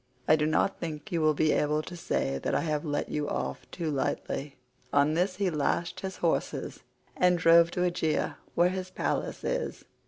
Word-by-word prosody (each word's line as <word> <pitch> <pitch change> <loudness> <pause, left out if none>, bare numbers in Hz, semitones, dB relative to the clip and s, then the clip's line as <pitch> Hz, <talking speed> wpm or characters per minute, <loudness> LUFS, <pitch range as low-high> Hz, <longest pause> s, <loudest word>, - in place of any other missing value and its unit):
I 155 - +7
do 150 -1 +1
not 155 +5 +1
think 160 +4 -6
you 170 -2 0
will 155 -1 +3
be 155 +1 +3
able 150 +1 +1
to 175 - -8
say 70 - -1
that - - -1
I - - +2
have 155 -3 -1
let 145 -2 -2
you 150 -1 -2
off - - -4
too 165 -3 -3
lightly." 140 0 -2 0.4
On 145 +2 +3
this 180 +3 +1
he 190 -1 0
lashed 170 +4 -1
his 190 0 -5
horses 170 - -1 0.4
and 180 -1 +4
drove 165 0 +6
to 180 - -3
Aegae 170 -3 0 0.2
where 175 +1 +4
his 185 0 -4
palace - - -2
is. - - -2
165 Hz, 190 wpm, -29 LUFS, 150-180 Hz, 0.4 s, I